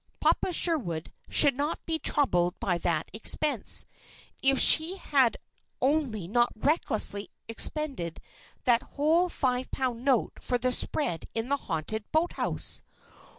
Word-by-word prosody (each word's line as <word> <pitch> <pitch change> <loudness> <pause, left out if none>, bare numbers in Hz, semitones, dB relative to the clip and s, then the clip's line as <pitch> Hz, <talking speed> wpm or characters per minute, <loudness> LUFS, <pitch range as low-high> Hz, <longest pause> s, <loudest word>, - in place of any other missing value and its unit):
"Papa - - +1
Sherwood" 235 - +2 0.2
should 285 -2 +5
not 290 +5 -3
be 325 -1 -3
troubled 180 - 0
by 175 -3 -2
that 165 -2 -2
expense! 240 +3 +2 0.6
If 270 0 +3
she 340 +5 +6 0.8
only 270 -6 -1
had 175 +5 -11
not 240 0 +2
recklessly 220 -6 +1 0.2
expended 230 - 0 0.4
that 240 -1 +3 0.2
whole 325 +5 +2
five 255 -5 -2
pound 250 -3 -4
note 260 -4 0
for 250 - -2
the 255 +1 -1
spread 175 - 0
in 225 +2 -3
the 280 - +1
haunted 210 - -5
boathouse! 325 +3 -1
255 Hz, 125 wpm, -27 LUFS, 210-300 Hz, 0.8 s, she